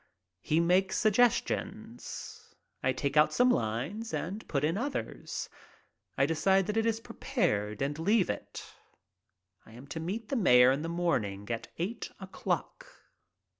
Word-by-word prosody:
He 150 - +1
makes 185 +3 +2
suggestions. 220 +2 -1 0.3
I 130 - +2
take 140 +2 -2
out 150 - +6
some 250 0 +4
lines 150 - -2
and 200 +6 -5
put 140 -2 -1
in 160 +3 +1
others. 270 +7 -4 0.7
I 135 - +4
decide 185 +5 +2
that 210 - -2
it 225 0 +2
is 225 -1 +1
prepared 170 - -1
and 145 +2 -2
leave 200 +3 +3
it. - - -7 1.0
I 110 - -16
am 125 +4 -11
to 160 - -4
meet 205 +7 -4
the - - -1
mayor 125 - +6
in 135 +2 0
the 165 - -3
morning 105 - -1
at 115 - -3
eight 200 +8 -3
o'clock. 195 - -4
170 Hz, 145 wpm, -30 LUFS, 135-220 Hz, 1.0 s, out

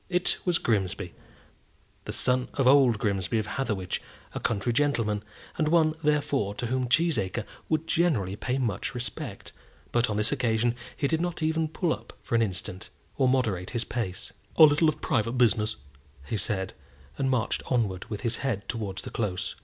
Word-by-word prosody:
It 180 0 +1
was 175 -3 +3
Grimsby, 100 -6 -1 0.9
the - - -4
son 125 0 +1
of 135 - +1
old 130 -3 +6
Grimsby 100 0 0
of 110 - 0
Hatherwich, 105 -6 -2 0.3
a - - -3
country 115 +1 0
gentleman, 115 -7 +1 0.4
and 155 - +2
one, 155 -1 +4
therefore, 145 -9 +1
to 120 - -3
whom 125 +1 -1
Cheesacre 120 - +2 0.2
would 155 0 +1
generally 135 - +1
pay 125 +5 -2
much 115 -1 -2
respect; 125 0 -5 0.4
but 120 0 +2
on 105 - -1
this 105 +2 +1
occasion 120 -3 +1 0.2
he 140 - +1
did 160 +2 0
not 175 -2 -2
even 160 0 +1
pull 160 +1 0
up - - -10
for - - -6
an 115 - +4
instant, 95 -3 -3 0.3
or 130 - +3
moderate 110 -9 +1
his 120 -2 -1
pace. 105 -7 -4 0.2
"A - - +9
little 150 +1 +6
bit 155 - +2
of - - -22
private 115 -5 +1
business," 110 -3 +2 0.5
he 110 - -3
said, 95 -1 -1 0.5
and 135 -1 +1
marched 125 -4 +1
onwards 105 -8 0
with 105 -2 -4
his 120 -1 -1
head 115 -8 -2
towards 105 -5 -3
the - - -7
Close. 100 -4 -2
120 Hz, 175 wpm, -28 LUFS, 105-145 Hz, 0.9 s, A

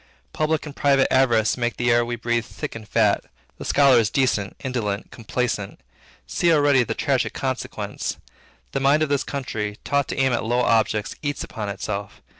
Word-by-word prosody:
Public 155 0 0
and 145 -2 -8
private 140 -2 +3
avarice 120 -5 +3
make 120 -1 -1
the 120 0 +2
air 120 0 +4
we 120 0 -3
breathe 120 0 -1
thick - - -6
and 110 -2 -9
fat. 105 -3 +3 0.4
The - - -6
scholar 135 -4 +5
is 110 -3 +2
decent, 105 -7 0
indolent, 115 -6 -3
complaisant. 115 -3 -3 0.5
See 170 - +1
already 145 -4 +4
the - - -3
tragic - - 0
consequence. - - -3 0.5
The 135 - -1
mind 140 +3 +4
of 155 - -1
this 140 -1 +1
country, 105 -7 -4
taught 140 -1 +1
to - - -4
aim 135 -1 +3
at - - 0
low 120 +2 +1
objects, 110 -3 +1
eats 145 -2 -2
upon 105 -2 -5
itself. 100 0 -5
120 Hz, 180 wpm, -23 LUFS, 110-140 Hz, 0.5 s, scholar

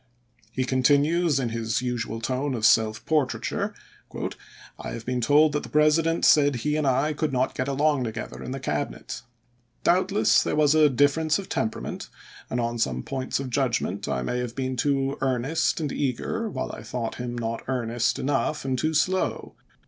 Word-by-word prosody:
He 130 - -1
continues 145 +5 +3
in 125 -3 -1
his 115 +1 -2
usual 115 -2 -3
tone 130 +3 -1
of 110 -2 -1
self 110 -1 +3
portraiture: 155 -4 -1 0.5
" - - -18
I - - -6
have 115 0 -7
been 125 0 -1
told 145 +5 +5
that 150 0 -1
the - - -9
Presi 150 +2 +4
dent 165 +1 +1
said 145 -2 +5
he 150 +5 -1
and 155 -2 0
I 135 +4 +2
could 155 0 -1
not 130 0 0
get 130 - -2
along 140 -1 +1
together 110 0 -6
in - - -6
the 135 +1 -4
Cabinet. 75 - -4 0.6
Doubtless 190 +3 +3
there - - -1
was 150 -1 +4
a 155 -1 +5
difference 145 +4 +2
of 195 - -7
temperament, 110 - -3 0.4
and 125 - -1
on 120 0 -2
some 65 - 0
points 130 -1 -3
of 135 -2 -5
judgment 125 -3 -1
I 65 - -1
may 125 - -2
have 125 -1 -4
been 130 -1 -2
too 135 +2 0
earnest 135 +6 0
and 150 -3 -2
eager, 145 - -2
while - - -4
I - - -8
thought 120 -2 -4
him 120 -1 -4
not 115 -1 -3
earnest 120 -2 0
enough 145 +2 -1
and 130 -2 -1
too 155 +3 0
slow. 185 +5 0
135 Hz, 185 wpm, -25 LUFS, 120-150 Hz, 0.6 s, told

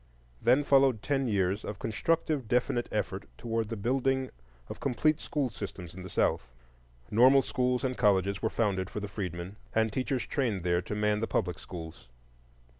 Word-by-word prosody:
Then 130 +5 +4
followed 135 -6 +4
ten 135 -2 0
years 100 -1 +1
of 105 - -5
constructive 145 +4 0
definite 120 0 +1
effort 100 -2 -2
toward 115 -1 -2
the 115 - -3
building 130 +4 0 0.4
of - - -8
complete 155 +5 +1
school 140 -5 -1
systems 95 -5 -7
in 95 - -9
the 95 - -8
South. 65 -6 +1 0.6
Normal 130 +5 +6
schools 125 -1 0
and 130 -1 0
colleges 100 -3 +2
were 110 - +1
founded 95 -5 0
for - - -4
the 105 - -4
freedmen, 95 -1 -5 0.2
and 110 -1 +2
teachers 130 0 -1
trained 115 -10 -1
there 90 0 +2
to 105 - -5
man 105 0 +1
the 115 - -1
public 90 -1 -1
schools. 80 -8 -9
110 Hz, 170 wpm, -30 LUFS, 95-130 Hz, 0.6 s, Normal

